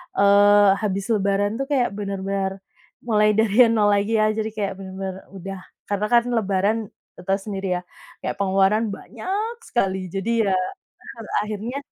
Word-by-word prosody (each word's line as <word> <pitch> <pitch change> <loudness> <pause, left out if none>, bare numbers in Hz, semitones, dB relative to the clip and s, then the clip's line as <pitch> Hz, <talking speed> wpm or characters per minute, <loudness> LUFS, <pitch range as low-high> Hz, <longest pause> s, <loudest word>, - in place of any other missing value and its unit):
eee, 205 0 +6
habis 200 -1 -1
lebaran 205 +2 +1
tuh 275 - -2
kayak 255 -6 +1
benar-benar 195 -1 -3 0.4
mulai 215 -2 +3
dari 220 +2 +5
0 210 -2 +3
lagi 205 +2 +1
ya, 215 0 +3
jadi 220 0 -2
kayak 200 -2 -2
bener-bener 190 0 -6
udah 195 0 -8 0.3
karena 205 +1 0
kan 240 -1 +5
lebaran 200 0 +1 0.4
te - - -12
tau 195 0 +2
sendiri 195 -3 -3
ya, - - -12 0.4
kayak - - -2
pengeluaran 195 +3 +2
banyak 400 - -4
sekali. 190 -5 -1
Jadi, 220 +4 0
ya, 195 - +1 0.6
pada 225 -2 -10 0.2
akhirnya 215 +5 -4
205 Hz, 150 wpm, -23 LUFS, 195-220 Hz, 0.6 s, eee